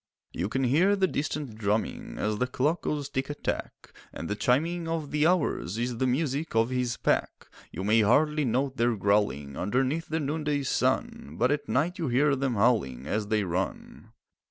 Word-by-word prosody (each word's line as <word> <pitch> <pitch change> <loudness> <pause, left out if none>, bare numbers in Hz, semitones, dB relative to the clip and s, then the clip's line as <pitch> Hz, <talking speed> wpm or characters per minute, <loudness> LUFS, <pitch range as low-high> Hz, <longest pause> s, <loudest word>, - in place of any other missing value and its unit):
You 95 - -3
can 135 +4 -1
hear 165 +11 +4
the 190 -1 +2
distant 145 -8 -3
drumming 105 +1 -2
As 105 0 -1
the 125 - +1
clock 145 +6 0
goes 145 -2 -2
tick 135 +2 -3
a 145 - -3
tack, - - -5 0.2
And 80 - -6
the 105 - -2
chiming 165 +10 +1
of 165 -3 -3
the 150 +1 +3
hours 150 - 0
Is 120 0 -2
the 130 - +2
music 140 +2 -1
of 115 +2 +3
his 125 -2 -1
pack. - - 0 0.3
You 95 - -5
may 110 +3 +4
hardly 150 +8 +3
note 130 +2 0
their 120 0 +2
growling 100 -9 0
Underneath 130 - 0
the 160 +1 0
noonday 150 -1 -1
sun, 80 - -1
But 125 +3 +2
at 145 0 -2
night 170 +8 0
you 165 - -1
hear 140 +3 +3
them 135 -2 -1
howling 100 - +1
As 105 +6 -2
they 105 -1 +1
run. 90 0 -4
130 Hz, 185 wpm, -28 LUFS, 110-150 Hz, 0.3 s, hear